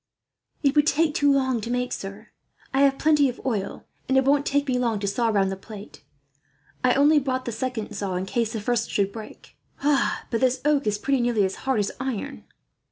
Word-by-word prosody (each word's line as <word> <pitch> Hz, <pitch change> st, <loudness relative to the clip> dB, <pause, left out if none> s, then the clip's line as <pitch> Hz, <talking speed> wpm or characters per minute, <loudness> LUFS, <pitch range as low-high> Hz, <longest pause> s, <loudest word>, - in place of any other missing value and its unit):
"It 280 Hz, 0 st, +3 dB
would 295 Hz, 0 st, +4 dB
take 315 Hz, -1 st, +2 dB
too 285 Hz, -1 st, +3 dB
long 260 Hz, -4 st, +1 dB
to 230 Hz, -, -5 dB
make, 250 Hz, +1 st, -1 dB
sir. 200 Hz, +3 st, -7 dB, 0.4 s
I 270 Hz, -, +3 dB
have 275 Hz, -1 st, +4 dB
plenty 300 Hz, -3 st, +3 dB
of 245 Hz, -, -7 dB
oil, 215 Hz, -7 st, -3 dB, 0.2 s
and 265 Hz, -, +3 dB
it 265 Hz, -, +3 dB
won't 285 Hz, +1 st, +3 dB
take 285 Hz, 0 st, +1 dB
me 250 Hz, -1 st, +1 dB
long 230 Hz, -4 st, 0 dB
to -, -, -2 dB
saw 230 Hz, +4 st, 0 dB
round 200 Hz, -3 st, +2 dB
the -, -, -3 dB
plate. 205 Hz, +1 st, -11 dB, 0.8 s
I 250 Hz, 0 st, +4 dB
only 295 Hz, +2 st, +5 dB
brought 260 Hz, -2 st, -2 dB
the 235 Hz, -, -3 dB
second 225 Hz, -2 st, -4 dB
saw 200 Hz, -3 st, -3 dB
in 185 Hz, +1 st, -2 dB
case 225 Hz, +2 st, -1 dB
the 220 Hz, -, -3 dB
first 230 Hz, +1 st, 0 dB
should 200 Hz, -1 st, 0 dB
break. 220 Hz, 0 st, -11 dB, 0.3 s
But 285 Hz, -1 st, +1 dB
this 255 Hz, 0 st, +2 dB
oak 295 Hz, -4 st, +2 dB
is 210 Hz, 0 st, +1 dB
pretty 270 Hz, +4 st, 0 dB
nearly 235 Hz, -4 st, +2 dB
as 190 Hz, -, -2 dB
hard 265 Hz, -3 st, +2 dB
as 200 Hz, -, -2 dB
iron." 250 Hz, -, -4 dB
250 Hz, 215 wpm, -24 LUFS, 210-275 Hz, 0.8 s, only